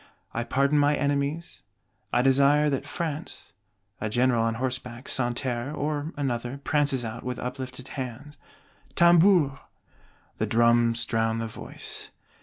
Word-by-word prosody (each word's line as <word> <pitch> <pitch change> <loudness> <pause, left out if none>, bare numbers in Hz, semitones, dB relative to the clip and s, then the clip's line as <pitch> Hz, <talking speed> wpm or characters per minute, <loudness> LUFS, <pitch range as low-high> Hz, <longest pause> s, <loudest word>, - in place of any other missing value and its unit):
I 120 - -1
pardon 140 +4 +2
my 145 +1 +4
enemies; 145 +3 -1 0.5
I 120 - +3
desire 140 +3 +4
that 135 - -2
France 160 -2 -5 0.2
" 100 +1 -41
A 110 - -1
General 120 +1 +2
on 115 0 0
horseback, 125 0 -4
Santerre 125 +2 -1
or 150 +1 -2
another, 125 -2 -2
prances 145 -5 +1
out, 110 +1 -6
with 125 -1 -3
uplifted 130 0 -6
hand: 135 +3 -6 0.6
"Tambours!" 170 -4 +5 0.8
The - - -1
drums 120 0 +3
drown 115 -1 0
the 115 - -2
voice. 110 - -5
130 Hz, 130 wpm, -26 LUFS, 120-145 Hz, 0.8 s, Tambours